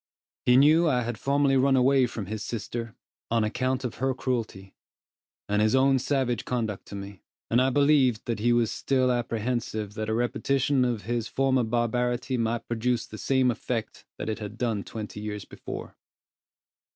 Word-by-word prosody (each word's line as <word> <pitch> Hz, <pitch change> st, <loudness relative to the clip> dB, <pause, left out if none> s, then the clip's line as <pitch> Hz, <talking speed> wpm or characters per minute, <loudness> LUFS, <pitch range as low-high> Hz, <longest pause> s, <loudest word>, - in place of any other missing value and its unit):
He 125 Hz, 0 st, +6 dB
knew 155 Hz, +5 st, +6 dB
I 125 Hz, -3 st, +1 dB
had 115 Hz, -1 st, -4 dB
formerly 140 Hz, 0 st, +2 dB
run 135 Hz, +1 st, +4 dB
away 130 Hz, 0 st, +4 dB
from 110 Hz, -3 st, -5 dB
his 105 Hz, +2 st, -5 dB
sister, 115 Hz, +2 st, -5 dB, 0.3 s
on 115 Hz, -1 st, +2 dB
account 130 Hz, +4 st, -1 dB
of 125 Hz, -, -4 dB
her 130 Hz, +1 st, 0 dB
cruelty, 110 Hz, -7 st, -3 dB, 0.7 s
and 105 Hz, +1 st, +1 dB
his 110 Hz, +3 st, +3 dB
own 135 Hz, 0 st, +4 dB
savage 130 Hz, -2 st, 0 dB
conduct 110 Hz, -5 st, -3 dB
to -, -, -8 dB
me; 100 Hz, -3 st, -8 dB, 0.3 s
and 120 Hz, +2 st, +4 dB
I 130 Hz, -, +3 dB
believed 140 Hz, -4 st, +3 dB
that 115 Hz, -2 st, -2 dB
he 120 Hz, +3 st, +2 dB
was 120 Hz, -2 st, +2 dB
still 130 Hz, -2 st, +1 dB
apprehensive 115 Hz, -3 st, -2 dB
that 110 Hz, 0 st, -4 dB
a -, -, +1 dB
repetition 135 Hz, +3 st, +1 dB
of 120 Hz, -4 st, -1 dB
his 115 Hz, +1 st, -2 dB
former 135 Hz, -1 st, +1 dB
barbarity 120 Hz, +2 st, 0 dB
might 115 Hz, -1 st, -1 dB
produce 120 Hz, +1 st, 0 dB
the 110 Hz, -, -10 dB
same 130 Hz, +2 st, +2 dB
effect 115 Hz, -1 st, -4 dB
that -, -, -5 dB
it 110 Hz, 0 st, -2 dB
had 105 Hz, 0 st, -7 dB
done 115 Hz, -5 st, -1 dB
twenty 105 Hz, -1 st, -7 dB
years 105 Hz, -1 st, -5 dB
before. -, -, -8 dB
120 Hz, 175 wpm, -27 LUFS, 110-130 Hz, 0.7 s, He